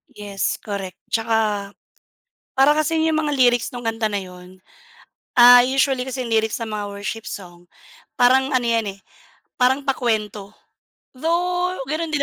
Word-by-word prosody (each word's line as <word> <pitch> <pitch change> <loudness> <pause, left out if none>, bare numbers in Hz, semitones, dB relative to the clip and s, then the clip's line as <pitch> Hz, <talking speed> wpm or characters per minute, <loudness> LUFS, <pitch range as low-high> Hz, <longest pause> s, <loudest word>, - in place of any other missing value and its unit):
Yes, 200 -2 -3
correct. 195 -3 -5 0.2
'Tsaka 220 -3 0 0.8
para 270 +2 +6
kasing 315 +1 +1
'yong 320 - +1
mga 295 -1 -1
lyrics 245 -2 +3
no'ng 245 -2 -6
kanta 225 -1 -1
na 205 - -1
'yon 180 0 -12 0.8
ah, 245 0 +9
usually 265 0 +1
kasi 260 0 -6
ang 230 - -3
lyrics 220 0 +1
ng 230 - -4
mga 205 -1 -4
worship 210 +2 -6
song, 175 -3 -10 0.6
parang 260 +2 +4
ano 255 -3 +1
'yan, 230 -1 +1
eh, - - -25 0.6
parang 265 +3 +2
pakuwento. 215 -6 -2 0.7
Though 355 +4 -1
gano'n 315 +3 -2
din 285 - +1
235 Hz, 145 wpm, -21 LUFS, 205-270 Hz, 0.8 s, ah